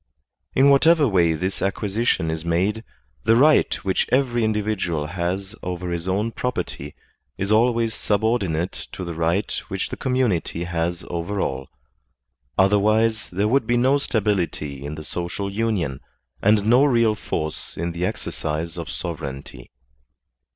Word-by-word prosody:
In 140 +2 +6
whatever 150 +2 +5
way 85 -6 +3
this 95 +5 -3
acquisition 100 -3 0
is 80 0 -4
made, 95 +7 0 0.4
the 115 +1 +4
right 150 +5 +5
which 95 - +1
every 125 -3 +2
individual 105 -8 -1
has 90 +4 -3
over 90 0 -4
his 85 +1 -3
own 105 +5 0
property 110 - -4 0.4
is 100 +2 -2
always 115 0 +3
subordinate 100 -6 -1
to 95 - -5
the 85 -1 -4
right 85 +5 0 0.2
which 95 -2 -3
the - - -5
community 120 -10 0
has 85 0 -2
over 85 +4 -3
all; 65 -5 -2 0.9
otherwise 110 +3 +3
there 100 +4 0
would 125 0 +2
be 120 0 +2
no 130 +4 +3
stability 95 - -1
in 75 +2 -5
the 75 - -8
social 90 +5 -4
union, 100 - -1 0.4
and 105 0 +3
no 120 +5 +5
real 115 -6 +4
force 80 -7 -4
in 85 +1 -2
the 85 +1 -4
exercise 85 -4 -3
of 85 - -6
sovereignty. 70 -6 -6
95 Hz, 140 wpm, -23 LUFS, 85-115 Hz, 0.9 s, In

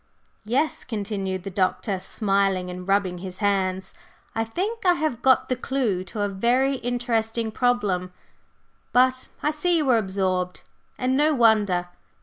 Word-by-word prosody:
"Yes," 270 +8 0
continued 200 -5 -3
the 195 - -5
Doctor, 190 +1 0
smiling 195 -3 0
and 180 +1 -8
rubbing 195 -3 +1
his 185 0 -7
hands, 190 -2 0 0.4
"I 225 - 0
think 395 - -3
I 360 -2 +5
have 310 -8 -2
got 260 -1 +4
the 255 - 0
clue 245 -7 -1
to 205 +3 -5
a 205 - +2
very 245 +7 +1
interesting 230 -2 -1
problem. 205 -7 0 0.8
But 255 +1 +3 0.2
I 300 - +2
see 340 +3 +1
you 300 -3 0
are 230 - +5
absorbed 185 -2 -2 0.3
and 255 +1 0
no 300 +2 +3
wonder! 210 -7 +3
220 Hz, 145 wpm, -24 LUFS, 190-255 Hz, 0.8 s, I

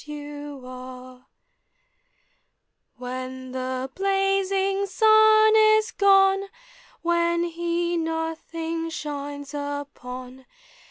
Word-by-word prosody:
105 260 -4 -9 1.8
When 255 +1 -6
the 260 0 -3
blazing 390 0 +1
sun 435 +2 +5
is 435 +1 +4
gone, 390 0 +4 0.6
When 340 0 +1
he 340 0 -1
nothing 325 0 -3
shines 285 -2 -6
upon 265 -3 -7
325 Hz, 65 wpm, -24 LUFS, 265-390 Hz, 1.8 s, sun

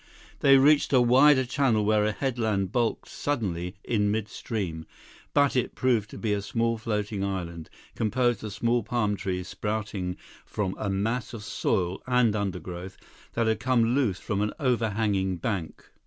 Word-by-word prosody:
They 135 -1 +6
reached 145 +2 +4
a 130 - +6
wider 130 +3 +5
channel 120 -5 +1
where 105 0 +3
a 110 - +1
headland 110 -6 -1
bulked 120 -1 0
suddenly 95 -10 -3
in 105 -3 +1
midstream; 105 -5 -3 0.4
but 145 -1 +3
it 125 - 0
proved 115 -5 +1
to - - -9
be 110 -3 -1
a 100 - -1
small 115 +2 -1
floating 105 -2 -2
island, 85 -4 -4 0.2
composed 120 +2 0
of 105 - -5
small 120 +3 +1
palm 110 -4 0
trees 90 -2 -3
sprouting 105 -4 -3 0.3
from 95 -3 -3
a 105 - -2
mass 110 +6 -1
of 105 - -8
soil 95 -4 -1
and 125 -4 +3
undergrowth 95 -2 -4 0.4
that 115 - +1
had 110 0 +1
come 125 -2 +2
loose 125 -9 +1
from 100 -2 -2
an 105 - -1
overhanging 110 -7 +1
bank. 90 -2 -4
110 Hz, 155 wpm, -27 LUFS, 100-120 Hz, 0.4 s, They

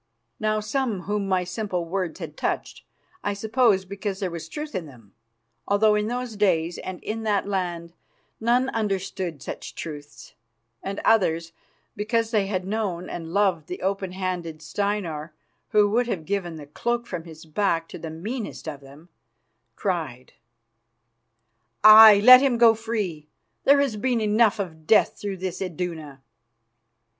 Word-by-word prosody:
Now, 215 0 +1
some 215 -2 -2
whom 205 +1 -2
my 185 -1 +1
simple 180 -1 -3
words 180 -1 -3
had 160 -4 -7
touched, - - -3 0.4
I 205 - -1
suppose 220 -2 +2
because 195 0 -5
there 190 -3 -2
was 170 -1 -7
truth 300 -1 -6
in 180 -5 -4
them, 115 -8 -17 0.5
although 210 +1 +4
in 210 0 0
those 245 -1 -4
days 175 -5 +1
and 185 -1 -6
in 225 +1 -4
that 205 -3 0
land 175 -4 -3 0.5
none 245 +3 +2
understood 190 - -3
such - - -7
truths, 145 -7 -9 0.5
and 195 +1 -4
others, 170 -7 +2 0.4
because 225 +2 -1
they 205 -4 +1
had 185 -2 -2
known 195 -4 -3
and 165 -1 -6
loved 185 -5 +1
the 180 - -6
open 190 -1 -2
handed 180 -4 -4
Steinar, 170 -5 -3 0.3
who 210 -1 +4
would 240 +2 +2
have 175 -9 -3
given 185 -3 -2
the 150 -2 -9
cloak 235 +10 -2
from 175 -7 -6
his 160 -1 -12
back 165 0 0
to - - -8
the 165 - -6
meanest 205 +6 -6
of 150 -3 -5
them, 140 +5 -16 0.7
cried: 155 - -3 1.5
"Aye, 215 -1 +10
let 255 +2 +10
him 265 -4 +2
go 230 -1 +7
free. 210 -9 -4 0.4
There 280 +1 +6
has 270 -7 0
been 245 +2 0
enough 215 0 +3
of 160 -6 -6
death 220 - +4
through 200 -2 -4
this 185 0 -5
Iduna." 160 -6 -5
195 Hz, 150 wpm, -24 LUFS, 165-215 Hz, 1.5 s, Aye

